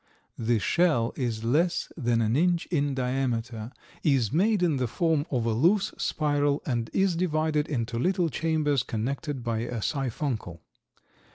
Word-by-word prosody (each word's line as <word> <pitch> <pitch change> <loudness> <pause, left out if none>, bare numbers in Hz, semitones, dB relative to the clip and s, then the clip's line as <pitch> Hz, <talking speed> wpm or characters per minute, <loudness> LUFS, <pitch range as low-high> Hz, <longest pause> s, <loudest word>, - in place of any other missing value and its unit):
The 115 0 +2
shell 125 - +2
is 115 -4 -2
less 160 +9 +1
than 120 -6 +1
an 110 +1 +1
inch 175 +2 +2
in 145 -4 +1
diameter, 125 -3 -2 0.3
is 135 -8 +2
made 200 +3 +3
in 160 -5 +2
the 125 -1 0
form 160 +3 0
of 120 -4 -1
a 115 - +1
loose 190 - +2
spiral 145 -1 0
and 120 -4 -1
is 190 -2 +2
divided 155 -3 0
into 115 -4 -2
little 180 +3 +1
chambers 155 -3 +1
connected 130 +4 -3
by 115 -2 -1
a 120 0 -3
siphuncle. 120 - -3
140 Hz, 150 wpm, -27 LUFS, 115-160 Hz, 0.3 s, made